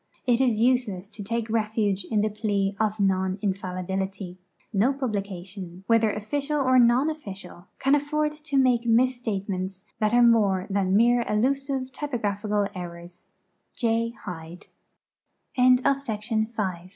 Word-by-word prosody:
It 245 0 +3
is 240 -5 +2
useless 230 -6 +1
to 215 -1 -10
take 230 +2 -2
refuge 215 -3 0
in 215 +1 0
the 215 - +1
plea 205 -2 -1
of 215 0 0
non 190 -1 +1
infallibility. 190 -1 -3 0.3
No 220 +7 +3
publication, 195 -7 -5
whether 230 0 +3
official 280 +9 -2
or 255 -2 +4
non 245 +4 +4
official, 195 - -7
can 270 +1 +2
afford 300 +1 +1
to 300 -2 -4
make 250 -3 +3
misstatements 205 -6 0 0.2
that 215 -1 +2
are 240 0 +5
more 205 -6 +4
than 195 -1 +2
mere 240 +2 +4
elusive, 265 +4 0
typo 290 -2 -4
graphical 205 -1 -1
errors. 175 -1 -9 0.5
J. 230 0 0
215 Hz, 120 wpm, -25 LUFS, 195-245 Hz, 0.5 s, are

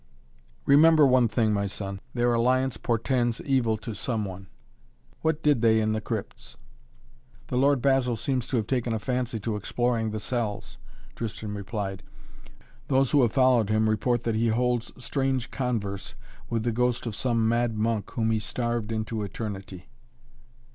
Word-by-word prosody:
"Remember 155 +2 +6
one 130 -2 +4
thing, 110 -1 +1
my 100 -1 0
son, 100 0 -5 0.2
their 120 0 +2
alliance 125 +2 +2
portends 120 +1 0
evil 125 -5 +1
to 110 +1 -6
some 110 -1 -2
one. 95 0 -8 0.7
What 160 -1 0
did 145 -6 +3
they 110 -1 +4
in 110 0 +1
the 110 - -2
crypts?" 100 - -6 0.9
"The - - -2
Lord 140 -2 +3
Basil 135 -3 +2
seems 125 +1 -2
to 130 - 0
have 110 - 0
taken 120 -1 -1
a 110 - -1
fancy 125 0 -2
to 110 +1 -2
exploring 115 +2 0
the 110 0 -4
cells," 110 -2 -3 0.4
Tristan 110 -2 -5
replied. 100 -1 -4 0.9
"Those 135 -1 +2
who 145 - +5
have 120 -3 +2
followed 130 -5 +4
him 110 0 +2
report 120 +2 +1
that 115 - 0
he 115 +2 +1
holds 120 +1 0
strange 130 -1 -1
converse 110 -7 -3 0.3
with 115 -2 -1
the 120 - 0
ghost 125 +1 0
of 115 -3 -4
some 115 -3 +1
mad 115 -1 +1
monk 110 -1 -1
whom 115 -1 0
he 110 - +1
starved 120 0 -2
into 110 0 -2
eternity." 100 -3 -6
115 Hz, 160 wpm, -26 LUFS, 110-125 Hz, 0.9 s, Remember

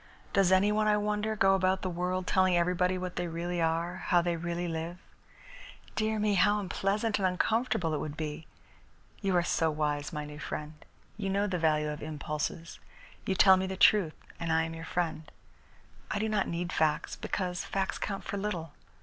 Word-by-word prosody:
"Does 195 -3 +4
any 190 +2 +5
one, 215 0 +2
I 210 0 +4
wonder, 210 +1 -1
go 195 -2 +4
about 190 0 +1
the - - 0
world 180 +1 -2
telling 185 -1 +3
everybody 180 +1 +2
what 180 -1 -5
they 175 0 -1
really 170 +1 -2
are, 165 +2 0
how 175 - +5
they 170 0 0
really 175 +1 -3
live? 165 +1 -4 1.0
Dear 220 0 0
me, 210 -1 +2
how 205 +2 +4
unpleasant 205 +3 0
and 190 - +3
uncomfortable 185 -2 0
it 150 - 0
would 150 -1 -5
be! 155 0 -5 0.7
You 195 -2 +1
are 175 - +3
so 165 -1 +1
wise, 150 -1 -1
my 150 -2 -4
new 150 0 -9
friend. 150 0 -5 0.4
You 195 -2 -2
know 200 +1 +1
the 185 -3 -1
value 155 -2 +2
of 150 - -7
impulses. 150 +2 -4 0.5
You 190 - +1
tell 190 0 +7
me 190 0 -1
the 190 0 -4
truth, 190 -6 +5 0.2
and 165 -1 -2
I 160 0 +3
am 165 0 -4
your 165 0 -7
friend. 160 -2 -2 0.8
I - - -1
do 215 +2 0
not 210 -2 +1
need 175 +1 -3
facts, 155 -1 +1
because 180 -2 -3
facts 195 -1 -2
count 195 -1 -3
for 200 - -4
little. 175 -7 -3
180 Hz, 190 wpm, -30 LUFS, 165-195 Hz, 1.0 s, tell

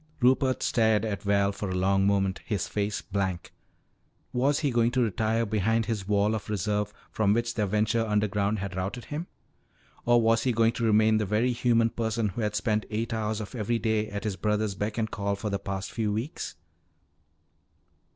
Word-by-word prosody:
Rupert 130 0 +3
stared 110 -2 +2
at 100 -2 -3
Val 100 -1 +2
for 100 0 -5
a 90 - -2
long 95 +1 +2
moment, 95 -1 +1
his 105 -6 -2
face 105 0 -2
blank. 95 -3 -3 0.8
Was 140 +4 +2
he 145 -3 +1
going 120 -1 +3
to 130 - +2
retire 110 +1 0
behind 110 +2 +1
his 105 -5 -3
wall 105 +1 +2
of 110 -1 -4
reserve 105 0 -1 0.2
from 105 -2 +2
which 120 0 0
their 105 -3 0
venture 110 +3 +1
underground 105 -1 0
had 100 -1 -5
routed 95 +6 -4
him? 155 +4 -5 0.8
Or 120 0 +4
was 115 0 +3
he 125 0 +1
going 115 0 +3
to 115 0 -4
remain 110 0 +4
the 105 - -1
very 110 +5 +2
human 115 -2 +2
person 110 -1 -1
who 110 +5 -5
had 105 -1 -1
spent 105 0 0
eight 115 +2 -2
hours 110 -1 -1
of 105 - -7
every 115 0 -1
day 110 -1 0
at 100 -1 -5
his 105 -3 -2
brother's 105 -1 0
beck 105 +3 -3
and 110 -1 -1
call 100 0 -1
for 105 +1 -4
the 100 - -1
past 95 0 -4
few 110 -3 -1
weeks? 115 +9 -4
110 Hz, 190 wpm, -27 LUFS, 100-115 Hz, 0.8 s, Or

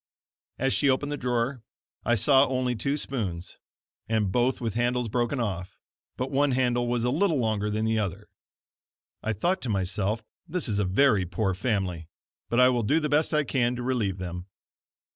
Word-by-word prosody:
As 135 +1 +1
she 145 - +3
opened 140 +2 +1
the - - -1
drawer, 125 -1 -1 0.4
I 120 - +2
saw 135 +5 +5
only 125 -1 0
two 140 +6 -1
spoons, 95 - -3 0.5
and 110 -4 +1
both 125 +4 +1
with 115 -4 -2
handles 120 +1 0
broken 120 +4 0
off, 95 -4 -3 0.4
but 130 +2 -3
one 140 0 +2
handle 120 -1 +1
was 120 -1 0
a 125 - +1
little 165 +2 +2
longer 110 -4 0
than 110 +1 -1
the 110 0 +1
other. 100 0 -4 0.9
I 110 - -1
thought 175 - 0
to 125 - -3
myself 100 +2 -1 0.2
this 180 -1 -2
is 105 -3 0
a 105 - +1
very 100 -1 +3
poor 95 +2 -1
family, 95 -5 -2 0.4
but 120 - +2
I 125 - +7
will 120 -2 +1
do 145 +9 +2
the 150 -1 -2
best 150 +2 +2
I 150 -1 +2
can 125 -3 0
to 125 - -5
relieve 115 -7 0
them. 90 0 -6
120 Hz, 185 wpm, -27 LUFS, 105-130 Hz, 0.9 s, I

